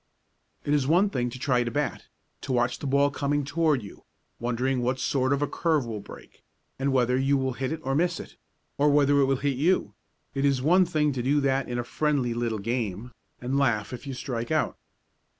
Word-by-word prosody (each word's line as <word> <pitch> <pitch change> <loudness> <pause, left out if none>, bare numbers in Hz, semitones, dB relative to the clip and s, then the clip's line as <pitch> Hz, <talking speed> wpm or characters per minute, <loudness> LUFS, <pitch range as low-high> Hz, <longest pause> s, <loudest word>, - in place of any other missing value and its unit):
It 145 - +1
is 140 -3 +2
one 185 +6 +3
thing 125 -6 -1
to 120 - -8
try 125 -1 +1
to 120 - -2
bat, 145 +4 -3 0.3
to - - -5
watch 120 0 +1
the 145 - -4
ball 140 +1 +3
coming 145 0 -1
toward 155 -4 +1
you, 100 - -12 0.4
wondering 125 +2 0
what 125 +2 0
sort 130 0 +1
of 140 +1 +1
a - - 0
curve 155 -2 0
will 110 -2 -4
break, - - -13 0.4
and 135 +1 +1
whether 125 -1 +2
you 135 +1 +2
will 130 -1 -1
hit 130 +1 -3
it 160 0 -4
or 135 - -1
miss 170 +5 +1
it - - -10 0.4
or 145 +1 +4
whether 145 0 +4
it - - +5
will 135 0 +2
hit 135 0 -1
you 175 +7 +1 0.4
it 135 - -1
is 140 -2 +3
one 180 +8 +4
thing 150 -4 +1
to 130 - -2
do 140 +4 +2
that 135 -1 0
in 120 - -2
a 120 - -1
friendly 135 -1 0
little 115 -2 -1
game, 115 0 -3 0.3
and 130 +3 -1
laugh 120 -4 +1
if 125 +3 -8
you 135 - -4
strike 120 -2 -4
out. 155 0 0
135 Hz, 220 wpm, -26 LUFS, 125-145 Hz, 0.4 s, it